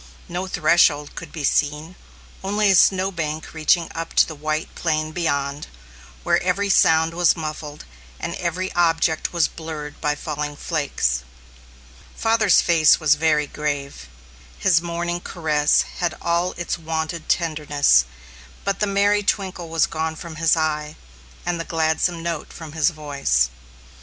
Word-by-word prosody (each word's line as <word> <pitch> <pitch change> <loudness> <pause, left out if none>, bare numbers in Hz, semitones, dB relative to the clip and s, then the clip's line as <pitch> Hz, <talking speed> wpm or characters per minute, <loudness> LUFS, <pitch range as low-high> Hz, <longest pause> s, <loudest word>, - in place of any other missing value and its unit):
No 180 +2 -4
threshold 155 -4 +3
could 165 -3 -9
be 155 - -6
seen, 150 +4 0 0.5
only 205 +1 +2
a - - +5
snow 190 +2 +4
bank 160 -3 -4
reaching 165 +2 +2
up 165 0 -6
to - - +6
the 160 - -7
white 155 +1 -3
plain 155 -2 -1
beyond, 145 -4 -2 0.6
where - - +2
every 195 +3 0
sound 160 -2 +4
was 175 0 +3
muffled, 155 -1 -6 0.3
and - - -4
every 180 +2 -3
object 165 -2 +1
was 170 -3 +2
blurred 155 -2 -8
by 150 -1 0
falling 150 0 -4
flakes. 145 - -1 0.9
Father's 225 -3 +3
face 165 -3 +5
was 155 -3 +4
very 155 -1 +2
grave. 140 - -4 0.5
His 170 -4 +3
morning 175 0 -3
caress 155 -4 +1 0.2
had 175 -2 -1
all 170 +1 0
its 175 0 -4
wonted 160 0 -4
tenderness, 150 - +3 0.6
but 200 -1 -1
the 210 - +1
merry 200 +1 +2
twinkle 190 -4 -2
was 165 -1 +2
gone 160 0 -3
from 160 0 -9
his 165 +1 +3
eye, 150 -1 -1 0.5
and 175 -1 -1
the - - -2
gladsome 165 +1 0
note 165 -2 -4
from 160 -2 -9
his 160 +1 +2
voice. 140 - 0
160 Hz, 145 wpm, -22 LUFS, 150-175 Hz, 0.9 s, to